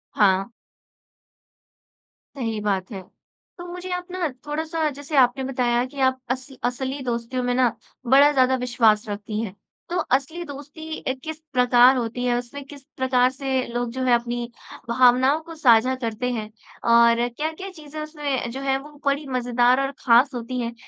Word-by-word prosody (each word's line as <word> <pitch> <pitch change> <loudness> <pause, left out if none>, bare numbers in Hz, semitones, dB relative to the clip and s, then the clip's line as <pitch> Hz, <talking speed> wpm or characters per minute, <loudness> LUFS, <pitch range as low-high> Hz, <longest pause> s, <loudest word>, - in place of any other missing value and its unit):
हाँ। 195 0 +3 1.8
सही 225 -5 -3
बात 195 -2 -1
है। 195 -3 -6 0.6
तो 350 - -8
मुझे 360 +1 -7
आप 360 0 -5
ना 365 -2 -1 0.2
थोड़ा 300 +2 -2
सा 320 -1 -1
जैसे 285 +2 -6
आपने 260 +1 +4
बताया 245 -2 +1
कि 275 +2 -10
आप 260 0 +2
अस 255 +1 -3 0.2
असली 260 +3 -2
दोस्तों 240 +1 -2
में 245 0 0
ना 255 -1 +4 0.4
बड़ा 275 +4 +6
ज़्यादा 260 -2 +3
विश्वास 230 -3 +2
रखती 210 +1 -4
हैं। 205 -4 -5 0.3
तो 350 - -1 0.2
असली 315 +6 -8
दोस्ती 295 +2 -8 0.2
किस 315 0 -6
प्रकार 250 +1 +6
होती 240 0 -3
है, 240 -1 +2
उसमें 245 +4 -6
किस 280 0 -13
प्रकार 255 -1 +3
से 265 -1 -2
लोग 240 0 -3
जो 260 +2 -3
हैं 250 - +4
अपनी 240 0 -3 0.4
भावनाओं 255 +4 +4
को 330 - -8
साझा 255 -3 +4
करते 230 +2 -2
हैं 220 -3 -4 0.4
और 235 0 +5
क्या-क्या 315 +9 -5
चीज़ें 310 -4 -10
उसमें 295 -5 -3
जो 265 +3 -6
है 270 -1 +1
वो 295 +2 -12
बड़ी 280 +1 0
मज़ेदार 245 0 +2
और 275 0 -1
ख़ास 250 +3 +5
होती 245 +1 -4
हैं। 235 0 -3
255 Hz, 165 wpm, -23 LUFS, 240-285 Hz, 1.8 s, बड़ा